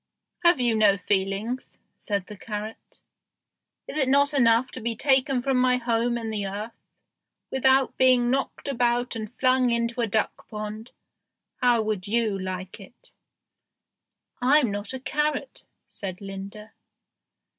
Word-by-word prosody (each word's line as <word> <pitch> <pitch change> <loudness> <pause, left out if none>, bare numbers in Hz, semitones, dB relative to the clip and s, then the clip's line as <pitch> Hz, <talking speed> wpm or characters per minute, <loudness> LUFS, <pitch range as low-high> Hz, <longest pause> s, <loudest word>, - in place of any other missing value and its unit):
"Have 345 -4 +5
you 240 -2 +2
no 210 -2 +4
feelings?" 200 +6 -2 0.2
said 200 -3 -3
the 210 - -10
carrot. 210 +1 -7 0.9
"Is 310 - -3
it 265 -2 +2
not 280 +2 +4
enough 240 -2 +3
to 255 - -7
be 230 0 -2
taken 265 0 +2
from 270 -1 +1
my 250 0 +3
home 235 0 0
in 225 -1 -4
the 205 -2 -2
earth, 210 +4 -5 0.8
without 265 0 +2
being 250 -2 +5
knocked 270 +2 -2
about 245 -2 0
and 215 -2 -5
flung 255 -1 +3
into 235 +1 -1
a 230 - +1
duck 220 +1 -1
pond? 215 +1 -6 0.7
How 245 -3 +3
would 210 -3 -3
you 220 -1 +1
like 185 +1 -6
it?" 195 +4 -15 1.3
"I'm 260 -2 +4
not 205 +2 -5
a 260 - -5
carrot," 300 - -2 0.2
said 185 -2 -6
Linda. 200 +2 -9
235 Hz, 140 wpm, -25 LUFS, 210-255 Hz, 1.3 s, Have